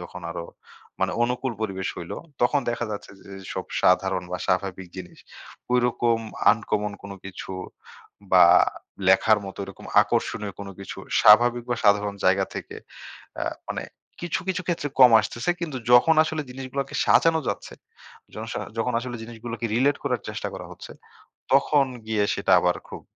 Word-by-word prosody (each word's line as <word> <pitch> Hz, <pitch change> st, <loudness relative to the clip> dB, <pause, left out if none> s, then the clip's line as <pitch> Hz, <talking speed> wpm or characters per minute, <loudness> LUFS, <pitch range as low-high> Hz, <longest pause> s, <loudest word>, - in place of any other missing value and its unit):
যখন 90 Hz, 0 st, -9 dB
আরো 85 Hz, 0 st, -5 dB, 0.6 s
মানে -, -, +1 dB
অনুকূল 125 Hz, +1 st, -1 dB
পরিবেশ 95 Hz, -2 st, -3 dB
হইল, -, -, -7 dB, 0.3 s
তখন 140 Hz, +4 st, +3 dB
দেখা 120 Hz, 0 st, -2 dB
যাচ্ছে 100 Hz, -, -7 dB
যেসব 95 Hz, -1 st, -7 dB, 0.2 s
সাধারণ 95 Hz, 0 st, +3 dB
বা 90 Hz, -, -2 dB
স্বাভাবিক 95 Hz, -1 st, -1 dB
জিনিস। 90 Hz, -1 st, -9 dB, 0.6 s
ঐরকম 120 Hz, -1 st, +2 dB, 0.3 s
uncommon 105 Hz, -2 st, -2 dB
কোন 100 Hz, 0 st, -8 dB
কিছু 95 Hz, 0 st, -8 dB, 0.8 s
বা 90 Hz, -1 st, +8 dB, 0.6 s
লেখার 105 Hz, +3 st, +5 dB
মতো 95 Hz, -, -9 dB
ওইরকম 95 Hz, -1 st, -11 dB, 0.2 s
আকর্ষণীয় 105 Hz, -3 st, -2 dB
কোন 100 Hz, -, -7 dB
কিছু 100 Hz, -, -8 dB, 0.2 s
স্বাভাবিক 120 Hz, +3 st, +6 dB
বা 120 Hz, -, +1 dB
সাধারণ 100 Hz, 0 st, +3 dB
জায়গা 95 Hz, +1 st, +4 dB
থেকে -, -, -7 dB, 0.7 s
আ -, -, 0 dB, 0.3 s
মানে -, -, -3 dB, 0.4 s
কিছু, 175 Hz, +2 st, -2 dB
কিছু 185 Hz, 0 st, -1 dB
ক্ষেত্রে 165 Hz, -4 st, -1 dB
কম 125 Hz, -2 st, +9 dB
আসতেছে। 120 Hz, +9 st, -2 dB
কিন্তু 155 Hz, -6 st, -3 dB
যখন 140 Hz, +7 st, +6 dB
আসলে 155 Hz, -1 st, -3 dB
জিনিসগুলাকে 135 Hz, +1 st, -5 dB
সাজানো 165 Hz, -1 st, +4 dB
যাচ্ছে, -, -, -5 dB, 0.6 s
জনস -, -, -6 dB, 0.2 s
যখন 125 Hz, +2 st, 0 dB
আসলে 120 Hz, 0 st, -6 dB
জিনিসগুলোকে 115 Hz, 0 st, -6 dB
relate 140 Hz, +4 st, +2 dB
করার 125 Hz, -6 st, -1 dB
চেষ্টা -, -, -4 dB
করা -, -, -7 dB
হচ্ছে, -, -, -11 dB, 0.6 s
তখন 140 Hz, +1 st, +4 dB, 0.2 s
গিয়ে 110 Hz, -2 st, +1 dB
সেটা 100 Hz, -, -1 dB
আবার 90 Hz, 0 st, +1 dB
খুব -, -, -8 dB
115 Hz, 150 wpm, -24 LUFS, 95-125 Hz, 0.8 s, কম